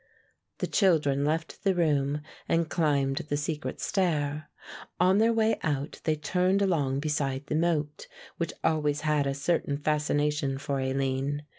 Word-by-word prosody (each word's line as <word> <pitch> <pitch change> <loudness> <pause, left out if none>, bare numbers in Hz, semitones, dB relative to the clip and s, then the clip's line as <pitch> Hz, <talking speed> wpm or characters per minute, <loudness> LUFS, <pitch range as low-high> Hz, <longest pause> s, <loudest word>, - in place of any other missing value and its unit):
The - - -1
children 150 -8 +2
left 160 +5 -2
the 195 -2 +2
room 150 -3 +1 0.3
and 165 -1 +1
climbed 140 -4 +1
the 145 -1 -2
secret 150 +1 -3
stair. 150 -5 -1 0.5
On 185 +2 +4
their 225 +1 +4
way 225 -1 +2
out 145 -1 -2
they 155 - +2
turned 185 +5 +1
along 140 -8 +1
beside 145 -2 -1
the 150 - -2
moat, 155 -3 0 0.3
which 170 - -2
always 150 -2 +1
had 150 -2 +1
a 135 - -1
certain 140 0 0
fascination 150 -1 0
for 140 0 -2
Aline. 135 +2 -1
150 Hz, 145 wpm, -28 LUFS, 140-165 Hz, 0.5 s, On